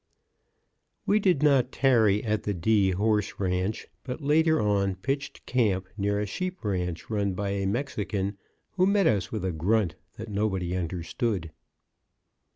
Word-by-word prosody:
_ -, -, -52 dB, 1.0 s
We 210 Hz, -, +3 dB
did 180 Hz, -8 st, +2 dB
not 135 Hz, -4 st, +4 dB
tarry 110 Hz, -6 st, +3 dB
at 110 Hz, -1 st, 0 dB
the 105 Hz, -, -2 dB
D. 100 Hz, +2 st, +3 dB
Horse 105 Hz, +2 st, 0 dB
Ranch, 95 Hz, +2 st, -1 dB, 0.2 s
but 130 Hz, +2 st, -5 dB
later 160 Hz, +2 st, +3 dB
on 100 Hz, -2 st, +1 dB
pitched 135 Hz, +9 st, -4 dB
camp 100 Hz, -7 st, +1 dB
near 100 Hz, 0 st, 0 dB
a 105 Hz, -, -1 dB
sheep 185 Hz, -, -5 dB
ranch 90 Hz, -2 st, -2 dB
run 100 Hz, -2 st, 0 dB
by 100 Hz, +1 st, -2 dB
a 100 Hz, -1 st, -1 dB
Mexican, 100 Hz, -4 st, -2 dB, 0.3 s
who 185 Hz, 0 st, +2 dB
met 200 Hz, -1 st, +3 dB
us 100 Hz, -, +1 dB
with 105 Hz, -4 st, -3 dB
a 95 Hz, -, 0 dB
grunt 90 Hz, +3 st, +1 dB, 0.2 s
that 110 Hz, -, -6 dB
nobody 95 Hz, -4 st, -1 dB
understood. 90 Hz, +1 st, -2 dB
105 Hz, 155 wpm, -27 LUFS, 95-125 Hz, 1.0 s, not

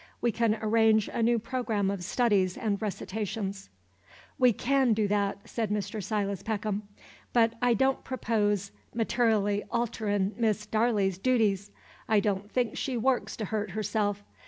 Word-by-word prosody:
We 235 Hz, -, +1 dB
can 225 Hz, 0 st, +1 dB
arrange 220 Hz, -1 st, +3 dB
a -, -, -1 dB
new 235 Hz, +1 st, +3 dB
programme 225 Hz, -4 st, -1 dB
of 195 Hz, -3 st, -4 dB
studies 200 Hz, -3 st, +1 dB
and 210 Hz, -2 st, -1 dB
recitations." 200 Hz, -1 st, -4 dB, 0.7 s
"We 250 Hz, -2 st, +6 dB
can 260 Hz, +1 st, +2 dB
do 215 Hz, -1 st, +1 dB
that," 200 Hz, 0 st, -1 dB
said 225 Hz, -3 st, -2 dB
Mr. 210 Hz, +1 st, -2 dB
Silas 200 Hz, -2 st, -1 dB
Peckham. 210 Hz, -1 st, -3 dB, 0.5 s
"But 230 Hz, -1 st, +4 dB
I 245 Hz, -1 st, +4 dB
don't 265 Hz, +4 st, +1 dB
propose 210 Hz, -6 st, 0 dB, 0.2 s
mater'lly 220 Hz, -3 st, +1 dB
alterin' 215 Hz, -4 st, -1 dB
Miss 215 Hz, -3 st, +1 dB
Darley's 210 Hz, -4 st, +1 dB
dooties. 210 Hz, -4 st, +1 dB, 0.4 s
I 215 Hz, -1 st, +5 dB
don't 205 Hz, 0 st, -1 dB
think 245 Hz, -4 st, 0 dB
she 260 Hz, -3 st, -2 dB
works 250 Hz, +2 st, 0 dB
to 220 Hz, -, -3 dB
hurt 210 Hz, +1 st, -2 dB
herself. 205 Hz, -1 st, -1 dB
215 Hz, 145 wpm, -29 LUFS, 205-230 Hz, 0.7 s, We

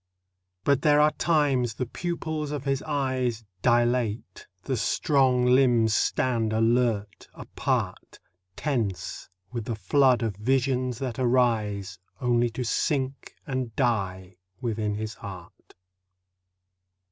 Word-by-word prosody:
But 140 Hz, +1 st, +2 dB
there 150 Hz, -1 st, +4 dB
are 150 Hz, +1 st, +5 dB
times 140 Hz, -10 st, +1 dB
the 125 Hz, -, -2 dB
pupils 160 Hz, +1 st, -4 dB
of 145 Hz, -2 st, -4 dB
his 135 Hz, -1 st, 0 dB
eyes 130 Hz, -6 st, -1 dB, 0.2 s
Dilate, 120 Hz, -2 st, 0 dB, 0.2 s
the -, -, -1 dB
strong 130 Hz, -4 st, +2 dB
limbs 125 Hz, -3 st, +4 dB
stand 115 Hz, -1 st, +1 dB
alert, 115 Hz, -2 st, +1 dB
apart, -, -, -3 dB, 0.4 s
Tense 105 Hz, -4 st, -3 dB, 0.2 s
with 120 Hz, -3 st, -4 dB
the 115 Hz, -, -3 dB
flood 125 Hz, +5 st, +3 dB
of 110 Hz, -4 st, -2 dB
visions 130 Hz, +1 st, 0 dB
that 125 Hz, -3 st, -4 dB
arise 110 Hz, -7 st, +1 dB, 0.2 s
Only 120 Hz, -2 st, +2 dB
to 120 Hz, +3 st, -4 dB
sink 135 Hz, +2 st, -1 dB
and 130 Hz, -4 st, -3 dB
die 95 Hz, -7 st, -1 dB, 0.2 s
within 110 Hz, -4 st, -2 dB
his 110 Hz, +1 st, -4 dB
heart. 95 Hz, -5 st, -11 dB
125 Hz, 110 wpm, -26 LUFS, 110-135 Hz, 0.4 s, are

